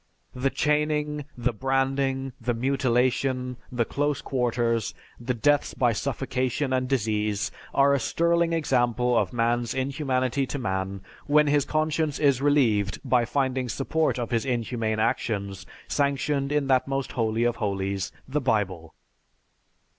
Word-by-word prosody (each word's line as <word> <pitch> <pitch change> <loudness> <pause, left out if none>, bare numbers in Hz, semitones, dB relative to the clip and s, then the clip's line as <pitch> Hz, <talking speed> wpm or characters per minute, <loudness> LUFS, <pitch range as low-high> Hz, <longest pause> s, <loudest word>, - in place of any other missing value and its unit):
The 130 +2 0
chaining, 150 0 0
the 120 0 0
branding, 135 +1 0
the 120 +1 -1
mutilation, 125 0 0
the 120 -2 0
close 145 +3 -1
quarters, 120 -3 0 0.2
the 125 +1 -2
deaths 145 +4 +2
by 120 -2 +2
suffocation 130 +2 -1
and 130 0 0
disease, 105 -5 0 0.2
are 140 0 +4
a 140 - +2
sterling 170 +5 +1
example 125 -6 +1
of - - +1
man's 120 0 0
inhumanity 135 -1 0
to 145 - -4
man 95 -5 -3 0.3
when 150 +1 +5
his 145 -1 +2
conscience 155 -1 0
is 140 -4 +3
relieved 115 -9 +2
by 125 -2 +3
finding 130 -1 -1
support 150 +5 0
of 120 -1 -3
his 115 -2 +1
inhumane 115 -3 -1
actions 100 -3 -1 0.2
sanctioned 140 0 0
in 150 -1 +1
that 130 -1 +2
most 135 -1 -2
holy 115 -1 0
of 120 0 +1
holies, 100 -2 -2 0.2
the 145 +3 -1
Bible. 95 -9 -1
130 Hz, 135 wpm, -26 LUFS, 115-140 Hz, 0.3 s, when